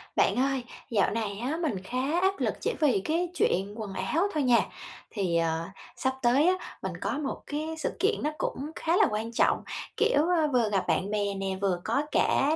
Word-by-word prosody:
Bạn - - +3
ơi, 270 0 +1 0.3
dạo 205 -5 +2
này 210 -2 -2
á, 265 +7 -2
mình 285 - -1
khá 260 - 0
áp 385 +1 +2
lực - - +1
chỉ - - 0
vì 290 -10 +3
cái 335 - 0
chuyện 195 - +1
quần 215 -3 -5
áo 195 - +1
thôi 305 -2 +1
nha. 245 -2 +5 0.5
Thì, 185 -6 0
ờ, 165 0 0 0.3
sắp 260 - 0
tới 265 +6 +4
á, 370 - +5 0.3
mình - - -3
có - - -1
một 290 -2 -3
cái 310 +2 -3
sự 315 - -1
kiện 420 +3 +2
nó 300 - +2
cũng 290 +4 -3
khá 335 +2 +1
là - - +6
quan 220 +2 -2
trọng, 230 - +2 0.3
kiểu, 290 - +3
ơ, 335 -3 +3
vừa 235 -4 +3
gặp 195 -3 0
bạn 190 - +1
bè 205 -1 0
nè, 195 0 -3
vừa 185 -3 +1
có 280 - +1
cả 290 +3 +3
250 Hz, 210 wpm, -28 LUFS, 200-310 Hz, 0.5 s, là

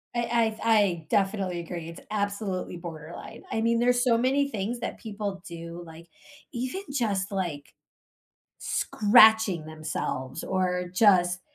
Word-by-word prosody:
I 235 -2 +1
I 230 - +1
I 175 -6 +1
definitely 195 -3 0
agree, 170 -1 -6
it's 170 - -10
absolutely 200 -3 -2
borderline. 165 -2 -9
I 220 - 0
mean, 230 +1 +2
there's 245 0 +3
so 235 -3 +3
many 275 +3 +2
things 225 +2 -3
that - - -5
people 205 -3 -5
do, 170 0 -8
like, 165 +1 -13 0.5
even 255 +11 -3
just 205 -6 -1
like, 170 -7 -4 0.9
scratching 215 -6 +4
themselves 155 -4 -4
or 180 -1 -1
just, 180 -3 +4
195 Hz, 130 wpm, -27 LUFS, 170-225 Hz, 0.9 s, scratching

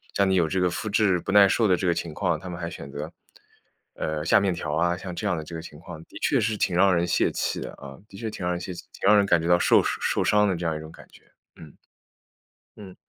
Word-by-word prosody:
像 100 - +3
你 - - +2
有 85 -3 +2
这 95 +4 -1
个 90 0 +2
麸 110 +5 -4
质 100 -3 +2
不 100 - -5
耐 100 0 +7
受 110 +3 +2
的 95 - +4
这 95 - -3
个 85 - +3
情 85 -1 -5
况， 85 -2 -1
他 90 - -9
们 85 -1 -7
还 85 -1 -4
选 70 -5 -9
择， 75 +3 -6 0.8
呃， 80 -1 -3
下 85 - +5
面 100 -2 0
条 75 -3 -4
啊， 85 +2 +1
像 90 -1 -7
这 105 - -5
样 95 - +1
的 80 - -5
这 80 +2 -9
个 80 - -5
情 75 -2 -12
况 85 -1 -10
的 - - -13
确 - - +2
是 110 0 0
挺 95 -3 0
让 95 +1 +4
人 85 0 +1
泄 - - +1
气 - - -2
的 - - -6
啊， 70 -1 -11
的 - - -14
确 115 0 -4
挺 95 -4 -6
让 90 - 0
人 90 - -4
泄 95 - -6
气。 - - -9
挺 - - -3
让 105 +1 +7
人 100 - +4
感 85 -4 +3
觉 85 - -3
到 90 0 +5
受 - - +5
受 - - -1
伤 105 0 +3
的 95 - 0
这 85 +1 -5
样 80 - -1
一 - - -7
种 80 0 -10
感 - - -15
觉， - - -20 0.3
嗯。 75 -3 -13 1.0
嗯。 95 -3 -11
90 Hz, 310 characters per minute, -25 LUFS, 80-100 Hz, 1.0 s, 耐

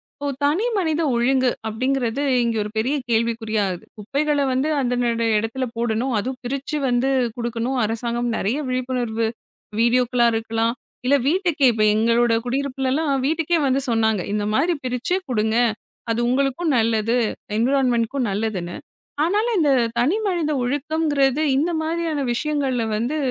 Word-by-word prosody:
இப்போ 285 - -5 0.2
தனி 315 +10 +2
மனித 325 -4 0
ஒழுங்கு 255 +2 +2 0.2
அப்பிடிங்கிறது 255 +3 -1 0.2
இங்க 230 -1 0
ஒரு 210 - -5
பெரிய 250 +7 +1
கேள்விக்குறியாகுது. 220 -5 0
குப்பைகள 285 +8 -1
வந்து 260 +4 0
அந்த 245 -1 0 0.2
அந்த 230 0 -1
இடத்துல 225 +5 -2
போடணும். 235 +2 0
அதுவும் 255 +4 -4
பிரிச்சு 275 +4 -3
வந்து 245 +2 +1 0.3
குடுக்கணும். 235 +2 -2
அரசாங்கம் 235 +2 -2
நிறைய 220 +8 -1
விழிப்புணர்வு 250 -3 -1 0.5
வீடியோக்களா 240 0 +3
இருக்கலாம். 225 +1 0 0.3
இல்ல 280 - +4
வீட்டுக்கே 335 -3 +2
இப்போ 215 -1 +2
எங்களோட 230 +2 +3
குடியிருப்புலலாம் 275 +3 -1 0.2
வீட்டுக்கே 330 +2 +1
வந்து 265 +1 +1
சொன்னாங்க. 220 -3 +2
இந்த 210 -1 -1
மாதிரி 325 +9 +2
பிரிச்சு 250 +8 -1
கொடுங்க. 220 -1 +1 0.5
அது 230 - 0
உங்களுக்கும் 275 +5 +1
நல்லது. 230 +1 +1 0.4
என்விரான்மெண்ட்டு 245 -1 +2
க்கும் 270 -4 -1
நல்லதுன்னு. 195 -4 -3 0.5
ஆனாலும் 420 +6 +1
இந்த 300 -3 +3 0.3
தனிமனித 345 - +1
ஒழுக்கம்ங்கிறது 290 +1 +1 0.2
இந்த 320 +5 +1
மாதிரியான 320 -3 -1
விஷயங்கள்ல 275 -3 -1
வந்து 250 +8 -1
255 Hz, 130 wpm, -22 LUFS, 230-285 Hz, 0.5 s, இல்ல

